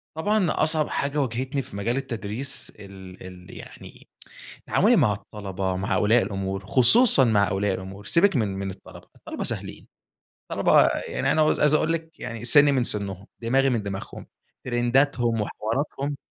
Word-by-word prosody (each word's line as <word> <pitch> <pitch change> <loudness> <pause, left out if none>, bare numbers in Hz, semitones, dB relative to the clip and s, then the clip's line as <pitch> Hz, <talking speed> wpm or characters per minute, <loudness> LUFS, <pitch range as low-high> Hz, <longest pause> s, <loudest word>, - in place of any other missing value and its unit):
طبعًا، 205 +4 +1 0.2
أصعب 155 -1 +1
حاجة 145 +1 -1
واجهتني 130 +2 -2
في 110 - -12
مجال 115 +5 -2
التدريس 125 +1 -5
ال 95 -2 -12
ال 90 -1 -12
يعني - - -13 0.6
تعاملي - - +3
مع 105 - +3
الطلبة 95 -2 -5
مع 95 +1 -2
أولياء 115 +3 +3
الأُمُور، 95 -1 -4
خصوصًا 140 - +5
مع 105 -4 +3
أولياء 95 0 0
الأُمُور 95 +2 -9
سيْبِك 175 - +3
من 115 -5 +1
من 95 0 -4
الطلبة 95 - -12
الطلبة - - -7
سهلين، - - -5 0.6
الطلبة - - +4 0.2
يعني - - -1
أنا 155 - +2
عايز 150 -1 +3
أقول 155 +1 +2
لِك، 165 0 -6
يعني 115 0 -6
سِنّي 145 +4 +6
من 130 -3 +1
سنّهم، 100 -3 -4
دماغي 135 +4 +2
من 115 -5 -1
دماغهم 100 -1 -7 0.4
ترنْداتهم 120 -1 +1
وحِواراتهم. 135 +7 -3
115 Hz, 150 wpm, -24 LUFS, 100-140 Hz, 0.6 s, سِنّي